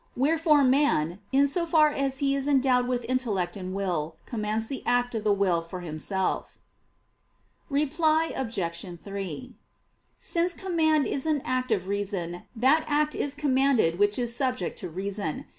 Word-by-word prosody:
Wherefore 300 +2 +3
man, 255 - +2
in 275 +1 +4
so 335 +5 +1
far 310 -2 +4
as 275 -2 -1
he 275 0 +1
is 275 0 -2
endowed 260 -3 +3
with 245 -1 -1
intellect 215 -9 -1
and 185 -2 -6
will, 170 -5 -2
commands 220 -1 -2
the 265 +3 -5
act 245 0 +1
of 220 -2 -3
the 210 - +2
will 190 -4 +2
for 175 +2 -8
himself. 175 +3 -2 1.1
Reply 310 +3 +1
Obj. 175 -7 -4
3: 195 -7 -6 0.6
Since 345 0 0
command 315 -5 +1
is 275 +3 -2
an 300 -3 +1
act 255 -1 -1
of 190 -4 0
reason, 195 -4 -3
that 265 +7 +3
act 300 0 +1
is 285 0 -3
commanded 265 - +2
which 205 0 +3
is 240 -2 -2
subject 255 0 -2
to 185 -5 -6
reason. 190 -1 -4
245 Hz, 155 wpm, -27 LUFS, 195-285 Hz, 1.1 s, in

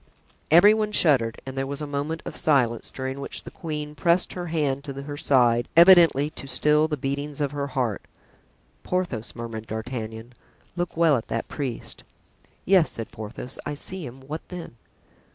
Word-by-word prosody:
Every 175 +7 +8
one 215 -1 0
shuddered 125 - +3
and 135 0 -7
there 135 0 -2
was 140 +1 -5
a 150 - -3
moment 145 +3 -3
of - - -6
silence, 125 -7 +2
during 130 +1 -5
which 140 - -5
the - - -10
queen 150 -2 -5
pressed 170 +3 +1
her 175 -1 -5
hand 145 -4 -1
to 140 -2 -6
her 145 +1 -6
side, 120 -5 +3
evidently 170 -5 +7
to 140 - -8
still 150 +3 +3
the 150 -2 -2
beatings 140 +2 -3
of 145 -2 0
her 140 -1 -3
heart. 125 -6 -1 0.8
("Porthos," 175 -12 -3
murmured 115 -2 -6
D'Artagnan, 110 +1 -6 0.4
"look 175 -2 -3
well 165 -4 +5
at 115 - -6
that 115 - -3
priest." 135 -6 -5 0.6
"Yes," 185 -3 +5
said 115 - -5
Porthos, 110 +4 -6
"I 145 - -4
see 185 +5 -6
him. 130 0 -9
What 150 +4 -6
then?" 175 -9 -8
140 Hz, 170 wpm, -25 LUFS, 125-160 Hz, 0.8 s, Every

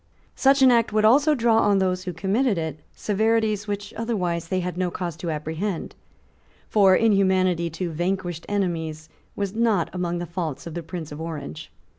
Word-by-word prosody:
Such 270 0 +4
an 260 - +7
act 235 -3 +3
would 215 0 +2
also 285 +7 +5
draw 230 -3 +3
on 205 -2 +3
those 185 -1 0
who 180 - -2
committed 205 +5 +1
it 160 -2 -3
severities 215 0 0
which 205 0 -4
otherwise 180 -8 -2
they 185 +2 0
had 180 0 -4
no 180 0 0
cause 175 -2 -4
to 170 0 -4
apprehend: 160 +5 -3 0.7
for 195 -3 +5
inhumanity 190 -5 +2
to 170 +2 -4
vanquished 175 0 -3
enemies 165 -6 -2 0.3
was 200 -1 -3
not 220 -6 +1
among 175 -1 -2
the 175 - -3
faults 170 -5 -4
of 170 - -7
the 170 - -4
Prince 165 -1 -7
of 145 +2 -7
Orange. 155 -1 -6
185 Hz, 175 wpm, -24 LUFS, 170-210 Hz, 0.7 s, an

